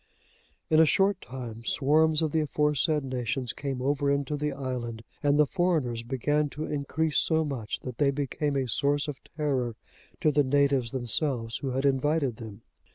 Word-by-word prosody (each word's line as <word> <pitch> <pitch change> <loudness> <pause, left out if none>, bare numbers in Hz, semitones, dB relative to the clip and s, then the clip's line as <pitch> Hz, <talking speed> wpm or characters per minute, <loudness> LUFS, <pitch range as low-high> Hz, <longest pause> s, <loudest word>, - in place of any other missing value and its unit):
In 155 - +6
a 160 - +8
short 195 +3 +2
time, 120 -3 -8
swarms 155 +6 +3
of 155 - 0
the 160 - +1
aforesaid 150 0 +1
nations 130 -1 -2
came 135 -3 -4
over 140 +1 +1
into 140 +1 0
the 150 0 -1
island, 125 -4 -5 0.2
and 145 0 +3
the 150 - +6
foreigners 155 -9 0
began 145 +5 0
to 155 - -2
increase 150 +2 0
so 160 -1 +2
much, 125 -7 -4
that 125 -3 -7
they 145 - +4
became 140 +1 -1
a 135 -2 0
source 140 +4 +1
of 145 -2 -5 0.2
terror 130 -6 0 0.5
to 155 - +4
the 145 0 +3
natives 140 -2 +2
themselves 120 -1 0
who 135 - -4
had 135 +2 -1
invited 140 -1 +1
them. 110 -4 -10
140 Hz, 170 wpm, -28 LUFS, 125-150 Hz, 0.5 s, a